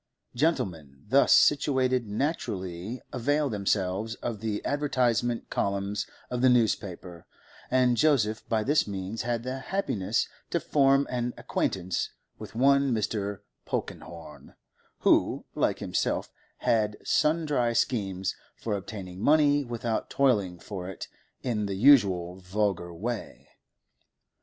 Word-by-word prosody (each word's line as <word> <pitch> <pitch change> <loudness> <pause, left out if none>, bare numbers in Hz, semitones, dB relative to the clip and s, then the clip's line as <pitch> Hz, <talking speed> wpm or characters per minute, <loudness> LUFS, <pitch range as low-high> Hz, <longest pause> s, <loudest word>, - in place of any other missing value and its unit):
Gentlemen 85 - -1
thus 140 +3 +5
situated 130 -5 +4
naturally 105 - -3
avail 145 +3 +1
themselves 100 +1 -1
of 115 -3 -5
the 105 -1 -3
advertisement 120 -5 0
columns 100 +1 -1 0.2
of 125 -1 -1
the 130 - +6
newspaper, 100 -7 0 0.4
and 125 -1 +3
Joseph 120 -7 +2
by 110 -1 +1
this 145 +2 +2
means 100 +2 -4
had 120 0 -2
the 130 +1 -4
happiness 135 - -1 0.2
to - - 0
form 135 -1 +3
an 120 -1 -2
acquaintance 90 -1 -1 0.3
with - - -9
one 140 +2 +4
Mr. 100 -2 -2 0.3
Polkenhorne, 80 -5 -6 0.5
who, - - +3
like - - +1
himself, - - -1 0.3
had 105 -2 +1
sundry 150 -7 +1
schemes 95 -7 0 0.2
for 110 -3 -3
obtaining 95 -2 -7
money 145 +1 +4
without 120 -2 -3
toiling 105 -10 +2
for 90 +1 -7
it 95 - -7 0.4
in 110 -5 -1
the 100 - -3
usual 95 -8 +4
vulgar 95 -2 -1
way. 110 +7 -5
110 Hz, 115 wpm, -28 LUFS, 95-130 Hz, 0.5 s, the